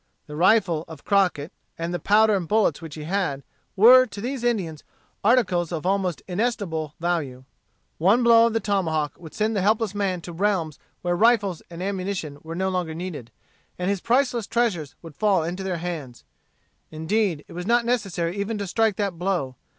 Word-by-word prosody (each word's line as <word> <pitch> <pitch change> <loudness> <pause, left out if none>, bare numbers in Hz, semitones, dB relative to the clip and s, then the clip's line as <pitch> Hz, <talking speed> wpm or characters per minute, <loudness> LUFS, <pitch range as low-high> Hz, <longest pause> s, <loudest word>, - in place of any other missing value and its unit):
The 150 - -9
rifle 175 -2 +3
of 160 -3 -11
Crockett, 185 -6 +1 0.2
and 170 +1 -3
the 175 - -2
powder 215 +1 +4
and 180 -4 -2
bullets 210 -7 +2
which 160 -3 -8
he 155 - -7
had, 160 -5 -2 0.3
were, 255 +5 +8
to 205 -2 -9
these 250 +3 -4
Indians, 190 -11 -1 0.4
articles 195 -7 +2
of 165 -1 -4
almost 190 -3 0
inestimable 180 -7 -2
value. 160 -7 -2 0.6
One 200 +9 +4
blow 230 -1 +6
of 230 - -2
the 225 - +1
tomahawk 160 -8 -1
would 160 -3 -12
send 215 +1 0
the 195 - +1
helpless 215 +1 +1
man 195 -3 -1
to 170 +1 -8
realms 175 -4 -1 0.2
where 175 0 +1
rifles 205 -4 +2
and 170 +1 -7
ammunition 185 -6 -3
were 165 +1 -7
no 190 +2 0
longer 180 -4 -2
needed, 165 -9 -6 0.5
and 180 +2 -1
his 200 -3 -2
priceless 245 -2 +1
treasures 200 - -1
would 165 -2 -10
fall 200 -6 +2
into 175 +4 -4
their 190 -2 -2
hands. 160 -8 -6 0.7
Indeed, 160 +1 -1
it - - -12
was 180 +2 -6
not 235 0 +3
necessary 195 -8 -1
even 205 +2 -2
to 200 - -3
strike 220 +2 +1
that 195 -5 -2
blow. 175 -9 -1
185 Hz, 180 wpm, -24 LUFS, 165-215 Hz, 0.7 s, were